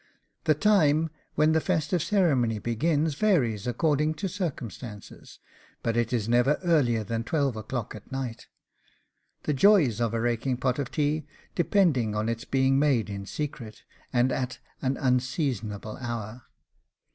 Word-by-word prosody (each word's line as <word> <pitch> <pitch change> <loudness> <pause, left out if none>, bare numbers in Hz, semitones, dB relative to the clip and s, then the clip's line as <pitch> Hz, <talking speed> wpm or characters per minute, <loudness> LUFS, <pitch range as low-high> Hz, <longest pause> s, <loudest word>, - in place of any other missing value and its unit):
The 155 - +4
time 160 -4 +3 0.2
when 155 +1 +4
the 160 0 +3
festive 170 -1 0
ceremony 150 - +2
begins 150 +8 0
varies 135 - +1
according 150 +4 +1
to 175 +6 -3
circumstances, 130 - -6 0.5
but 115 - 0
it 120 -1 +1
is 115 -4 0
never 125 +5 +3
earlier 130 -10 +2
than 115 +2 -3
twelve 135 0 0
o'clock 110 +1 -4
at 110 +4 -12
night; 130 -3 -5 1.0
the 150 - 0
joys 140 - +4
of 115 -1 0
a - - 0
raking 120 +2 0
pot 125 +1 0
of 140 - -2
tea 150 0 -1 0.3
depending 160 - +2
on 105 +2 0
its 115 0 -3
being 135 0 +2
made 130 -8 +2
in 100 0 -6
secret, 135 -6 -6 0.3
and 125 +1 +2
at 130 0 -2 0.2
an 130 0 0
unseasonable 125 - -1
hour. 120 -1 -5
130 Hz, 145 wpm, -27 LUFS, 115-155 Hz, 1.0 s, The